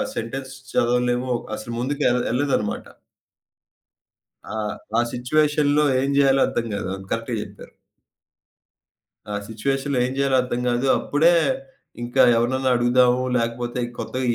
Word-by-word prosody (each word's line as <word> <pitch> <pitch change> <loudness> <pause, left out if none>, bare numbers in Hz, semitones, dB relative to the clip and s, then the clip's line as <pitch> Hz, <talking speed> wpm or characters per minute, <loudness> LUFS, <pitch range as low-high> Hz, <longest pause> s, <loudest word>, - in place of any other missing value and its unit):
Sentence 135 +3 -5 0.2
చదవలేము, 125 +1 +1 0.2
అసలు 115 +2 -7
ముందుకేల్ 125 -2 +1
యేళ్ళదన్నమాట. 130 -5 -1 1.6
ఆ! 110 - -6 0.4
ఆ - - +5
సిట్యుయేషన్‌లో 150 +3 +2 0.2
ఏం 135 +1 0
జేయాలో 135 -1 +4
అర్థం 115 - -2
గాదు. 95 - -3 0.2
కరెక్ట్‌గా 115 0 -2
జెప్పారు. 100 0 -11 1.6
ఆ - - -2
సిట్యుయేషన్‌లో 135 +4 -1
ఏం 130 - -4
జేయాలో 135 -1 +2
అర్థం 125 -1 -3
గాదు. 120 +2 0
అప్పుడే 160 +4 +3 0.7
ఇంకా 120 0 +2
ఎవరినైనా 130 +2 +1
అడుగుదాము, 125 +1 +3
లేకపోతే 120 +1 -2 0.2
కొత్తగ 130 - -4
125 Hz, 110 wpm, -23 LUFS, 120-135 Hz, 1.6 s, ఆ